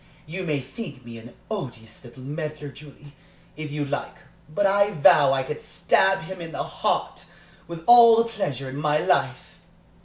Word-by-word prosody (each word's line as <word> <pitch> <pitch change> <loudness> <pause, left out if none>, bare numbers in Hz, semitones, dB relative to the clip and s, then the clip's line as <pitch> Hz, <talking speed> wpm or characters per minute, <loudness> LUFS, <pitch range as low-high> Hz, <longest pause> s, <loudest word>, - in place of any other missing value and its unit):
You 180 +4 -6
may 150 -4 -1
think 135 - -9
me 115 -1 -9
an 120 +1 -14 0.2
odious 120 - -7
little 125 +1 -13
meddler, 150 +1 -6
Julie, 145 0 -15 0.4
if 155 -1 -7
you 145 0 -3
like, 145 +1 -4 0.3
but 200 +6 0
I 200 +1 +3
vow 140 -2 +5
I 135 -1 0
could 150 +3 -6
stab 195 0 +1
him 190 -1 -8
to 170 - -6
the 160 - -4
heart, - - -3 0.4
with 170 -1 -8
all 235 -1 +8
the 230 - +4
pleasure 140 - -4
in 140 +2 -6
life!" 140 -3 0
150 Hz, 165 wpm, -24 LUFS, 135-180 Hz, 0.4 s, all